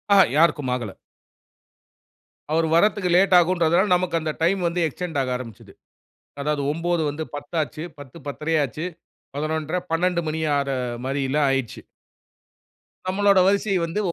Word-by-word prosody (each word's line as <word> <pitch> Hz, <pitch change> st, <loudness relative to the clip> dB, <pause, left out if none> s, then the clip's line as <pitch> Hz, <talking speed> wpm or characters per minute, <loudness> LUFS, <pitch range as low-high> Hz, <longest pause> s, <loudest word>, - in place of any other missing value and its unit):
ஆ -, -, +6 dB, 0.2 s
யாருக்கும் 150 Hz, -5 st, +3 dB
ஆகல. 120 Hz, -6 st, -5 dB, 1.6 s
அவர் 160 Hz, +1 st, +2 dB
வரதுக்கு 205 Hz, +1 st, +3 dB
லேட் 185 Hz, 0 st, +5 dB
ஆகும்ன்றதுனால, 175 Hz, +2 st, +2 dB
நமக்கு 180 Hz, -2 st, 0 dB
அந்த 155 Hz, -1 st, -2 dB
டைம் 190 Hz, +2 st, +2 dB
வந்து 175 Hz, +1 st, -2 dB
எக்ஸ்டெண்ட் 160 Hz, 0 st, -4 dB
ஆக 130 Hz, -1 st, -2 dB
ஆரம்பிச்சுது. 115 Hz, -5 st, -11 dB, 0.7 s
அதாவது 145 Hz, 0 st, -1 dB
9 170 Hz, +1 st, -1 dB
வந்து 155 Hz, +2 st, -5 dB
10ஆச்சு. 155 Hz, +1 st, -4 dB
10 145 Hz, +2 st, -12 dB
10:30 150 Hz, +3 st, -2 dB
ஆச்சு. 150 Hz, +6 st, -5 dB, 0.5 s
11:30, 155 Hz, +3 st, -2 dB
12:00 175 Hz, +1 st, +1 dB
மணி 155 Hz, +1 st, -2 dB, 0.2 s
ஆற 140 Hz, -1 st, -1 dB, 0.4 s
மாரில்லாம் 140 Hz, +1 st, 0 dB
ஆயிடுச்சு. 135 Hz, -4 st, -2 dB, 1.3 s
நம்மளோட 200 Hz, +1 st, +3 dB
வரிசையை 200 Hz, -1 st, +2 dB
வந்து 165 Hz, +6 st, -3 dB
160 Hz, 125 wpm, -23 LUFS, 145-180 Hz, 1.6 s, ஆ